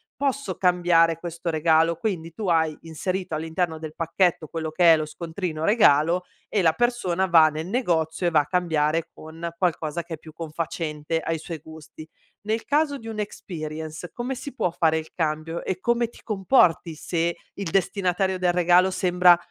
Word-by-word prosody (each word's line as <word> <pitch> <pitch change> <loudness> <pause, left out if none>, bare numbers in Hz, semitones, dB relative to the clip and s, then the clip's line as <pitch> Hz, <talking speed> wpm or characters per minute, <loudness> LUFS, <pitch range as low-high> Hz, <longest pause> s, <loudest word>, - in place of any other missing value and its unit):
posso 280 0 -2
cambiare 175 -3 +3
questo 170 0 -5
regalo?" 160 +1 +3
Quindi, 170 -5 -3
tu 210 +3 -5
hai 160 -3 +2
inserito 180 +2 -3
all'interno 160 +1 -2
del 155 -1 -7
pacchetto, 165 0 +1
quello 160 0 -4
che 170 +1 +6
è - - +4
lo 155 - -2
scontrino 160 +1 -4
regalo, 175 -5 +4 0.3
e 205 - +2
la 160 -1 +4
persona 190 -6 0
va 165 -3 +7
nel 155 +2 -5
negozio 175 -7 0
e - - +1
va 155 - +5
a 145 - -9
cambiare 165 -3 +1
con 160 +2 -8
qualcosa 170 -2 -1
che 170 -1 -6
è - - -19
più 155 +1 -14
confacente 160 -1 -3
ai 165 0 -2
suoi 160 +1 -7
gusti. 155 0 -12 0.4
Nel 220 +1 -1
caso 290 -1 +1
di 225 - -11
un' 220 -1 -5
experience, 160 -4 -6
come 245 +2 -4
si 270 +2 -7
può 180 - 0
fare 160 -2 +2
il 160 0 -6
cambio 160 0 -2
e 185 -1 -3
come 235 +3 +1
ti - - -17
comporti 190 -6 +2
se 170 +2 -1 0.2
il 195 -4 -5
destinatario 190 0 0
del 180 -1 +2
regalo 180 +1 +4
sembra 180 -1 +5
170 Hz, 175 wpm, -24 LUFS, 160-185 Hz, 0.4 s, va